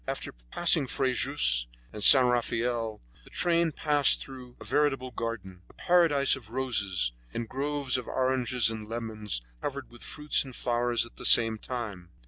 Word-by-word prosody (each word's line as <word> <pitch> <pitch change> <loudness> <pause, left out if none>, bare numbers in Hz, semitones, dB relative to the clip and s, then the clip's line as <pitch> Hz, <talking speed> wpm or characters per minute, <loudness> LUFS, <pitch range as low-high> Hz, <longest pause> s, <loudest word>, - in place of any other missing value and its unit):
After - - -4 0.2
passing 165 - +2
Frejus 125 - +1 0.3
and 105 -1 -6
St. 130 +2 +9
Raphael, 120 -2 -1 0.2
the - - -17
train 170 -1 +1
passed 145 -2 +4
through 125 -2 -11
a - - -10
veritable 135 -4 0
garden, 100 -7 -6
a - - -19
paradise 165 -6 +2
of 120 -5 -13
roses, 100 - -1 0.2
and 115 - -3
groves 140 0 -2
of 125 - -10
oranges 130 -2 0
and 110 -1 -8
lemons 110 - -5 0.2
covered 140 -3 -6
with 120 - -14
fruits 150 0 0
and 130 -3 -11
flowers 120 -1 0
at 120 - -16
the - - -9
same 115 -1 +5
time. 105 -9 -6
125 Hz, 155 wpm, -28 LUFS, 115-135 Hz, 0.3 s, St